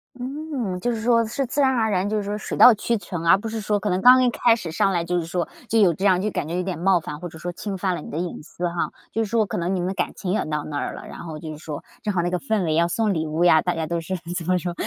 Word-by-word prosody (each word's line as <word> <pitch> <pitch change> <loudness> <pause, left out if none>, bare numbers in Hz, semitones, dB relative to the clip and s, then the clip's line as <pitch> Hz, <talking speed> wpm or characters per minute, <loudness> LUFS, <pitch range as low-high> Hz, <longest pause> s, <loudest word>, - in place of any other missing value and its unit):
嗯， 260 -6 -4
就 240 +6 0
是 225 -2 -3
说 230 0 +3
是 260 +5 -2
自 285 +4 -1
然 270 - +5
而 225 -4 +1
然 190 +1 0
就 215 - 0
是 210 - -1
说 205 +1 -3
水 - - -5
到 245 - +9
渠 230 +2 -1
成， 175 -4 -6
而 170 - +6
不 225 - -6
是 220 0 -4
说 210 0 0
可 205 - -2
能 180 +1 0
刚 255 +2 +8
一 250 - +4
开 235 0 +4
始 180 -8 -6
上 195 +4 +2
来 170 -2 0
就 175 +1 0
是 165 - -4
说 175 +1 -2 0.2
就 225 - +3
有 190 -5 +5
这 175 - -7
样 185 -2 +4
就 210 - 0
感 150 - -3
觉 170 - -3
有 180 - 0
点 180 -3 -4
冒 185 0 +3
犯， 150 -2 -7
或 175 +2 -6
者 160 - -12
说 175 +2 -4
侵 195 +2 -5
犯 185 0 0
了 - - -6
你 - - -9
的 150 - -5
隐 175 +1 -4
私 175 +3 -4
哈。 170 0 -2 0.2
就 225 - +1
是 210 - -5
说 225 -1 +2
可 180 - -4
能 175 +3 -1
你 - - -1
们 180 - -1
的 190 - -1
感 - - -1
情 180 - -3
也 215 - +1
到 150 -1 -2
那 145 - -4
儿 - - -3
了， - - -9
然 - - -10
后 160 -2 -7
就 160 0 -7
是 150 - -9
说 150 -2 -6 0.2
正 210 - -1
好 175 - +1
那 175 - 0
个 180 - 0
氛 220 -7 0
围 160 -2 0
要 170 +1 +3
送 215 +3 0
礼 160 -2 -2
物 155 +3 0
呀， 160 -2 +6
大 180 -1 -1
家 160 -1 -2
都 170 +1 -2
是 185 +3 -3 0.2
怎 170 - -3
么 185 0 +3
说， 175 0 -3
185 Hz, 365 characters per minute, -23 LUFS, 170-220 Hz, 0.2 s, 到